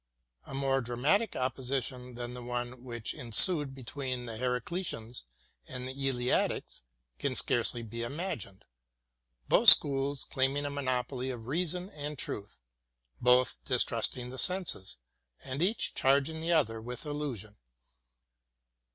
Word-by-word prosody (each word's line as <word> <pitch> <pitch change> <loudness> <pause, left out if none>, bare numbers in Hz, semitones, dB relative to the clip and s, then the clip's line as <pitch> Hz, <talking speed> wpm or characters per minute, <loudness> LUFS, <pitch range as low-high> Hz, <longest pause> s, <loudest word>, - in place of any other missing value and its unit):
A 135 - -6
more 135 -1 +1
dramatic 140 - +1
opposition 130 -1 -2
than 120 0 -5
the 125 - -7
one 120 +1 -4
which 120 -3 -3
ensued 135 - +4
between 130 -1 -4
the 115 -2 -6
Heracliteans 125 - -3 0.4
and 125 0 -6
the 130 - -5 0.2
Eleatics 125 -1 -1 0.4
can - - -1
scarcely 120 - +1
be 115 +1 -6
imagined 120 - -5 0.4
— - - -47
both - - +8
schools 140 -1 +6
claiming 135 +2 0
a 145 - -2
monopoly 130 -1 -2
of 120 -3 -6
reason 180 - -2
and 150 0 -6
truth, 100 - -5 0.6
both 125 - +3
distrusting 125 - 0
the 130 - -7
senses, 180 - -1 0.5
and 135 +2 -4
each 205 +6 +1
charging 140 +4 +2
the 165 +1 -1
other 115 -9 +2
with 125 +6 -7
illusion. 135 -9 -5
130 Hz, 125 wpm, -31 LUFS, 120-145 Hz, 0.6 s, both